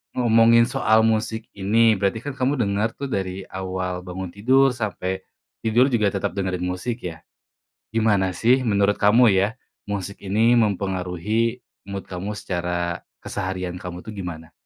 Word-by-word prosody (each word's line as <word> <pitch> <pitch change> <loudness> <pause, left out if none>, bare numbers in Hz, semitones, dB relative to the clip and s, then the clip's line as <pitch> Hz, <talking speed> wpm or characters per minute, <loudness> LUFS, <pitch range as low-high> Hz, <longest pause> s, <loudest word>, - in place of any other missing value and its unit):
ngomongin 115 -1 +5
soal 110 -2 +3
musik 110 0 0
ini, 110 +3 +3
berarti 100 +2 0
kan 145 - -4
kamu 130 +1 0
denger 100 +3 0
tuh 140 - -3
dari 95 0 -3
awal 95 -1 -4
bangun 90 0 -6
tidur 130 +5 +4
sampai 95 -4 -3 0.4
tidur 120 +4 +4
juga 105 -4 +2
tetap 100 -1 -2
dengerin 95 -2 -2
musik 90 +7 -3
ya. 80 -1 -9 0.7
Gimana 105 -4 +2
sih 120 +8 +3
menurut 100 0 +3
kamu 110 0 +6
ya, 100 +6 +1 0.3
musik 100 0 -4
ini 110 +5 +3
mempengaruhi 100 +2 0 0.3
mood 100 0 -5
kamu 100 +3 -5
secara 85 -1 -2 0.2
keseharian 95 -3 -4
kamu 90 -1 -6
tuh 110 - -7
gimana? 85 -5 -7
100 Hz, 145 wpm, -23 LUFS, 95-115 Hz, 0.7 s, kamu